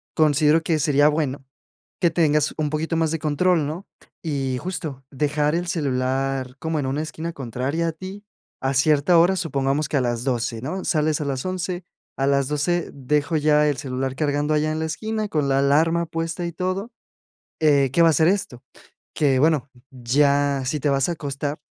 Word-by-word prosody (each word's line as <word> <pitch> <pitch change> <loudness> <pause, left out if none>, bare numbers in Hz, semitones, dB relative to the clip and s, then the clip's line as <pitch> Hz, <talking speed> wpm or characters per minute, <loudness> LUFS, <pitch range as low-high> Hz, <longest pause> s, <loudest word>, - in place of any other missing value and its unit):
considero 155 0 +4
que 160 -1 +1
sería 145 0 +4
bueno 145 -3 -2 0.6
que 175 - +4
tengas 150 -3 +2
un 155 -2 0
poquito 155 +2 -2
más 160 -1 +1
de 165 - -2
control, 160 +2 +1
¿no? 165 +7 -6 0.4
Y, 135 -5 -2
justo, 160 -5 -5
dejar 150 +2 0
el 175 +1 -2
celular 135 -3 -1
como 160 -1 -2
en 140 - -2
una 140 +3 -1
esquina 160 +2 -6
contraria 135 +5 -2
a - - -5
ti 190 +5 -9 0.4
a 135 +1 0
cierta 150 +4 +4
hora, 175 +3 +4
supongamos 140 -3 -1
que 145 - +1
a - - +2
las 120 -1 -1
12, 120 -3 -1
¿no? 180 +9 -4
Sales 155 -2 +1
a - - -2
las 135 -2 -3
11, 185 -1 -3 0.3
a 135 - 0
las 140 -1 +2
12 160 +4 0
dejo 145 +3 -1
ya 150 0 +3
el 145 - 0
celular 130 0 -3
cargando 145 +1 0
allá 155 0 +1
en 155 - -2
la 160 - -1
esquina 215 +6 -3
con 150 -5 0
la 135 0 +3
alarma 160 +5 +3
puesta 165 +2 -3
y 170 - -4
todo. 185 +6 -3 0.7
Eh, 140 -4 +4
¿qué 170 - +4
va 165 - +6
a - - +5
hacer 160 +2 +3
esto? 180 -11 -1 0.5
Que, 135 -4 +2
bueno, 150 -2 +2 0.2
ya 140 +2 +1
si 150 +4 -1
te 145 - 0
vas 135 +3 +1
a - - 0
acostar, 145 -1 -4
150 Hz, 190 wpm, -23 LUFS, 135-165 Hz, 0.7 s, va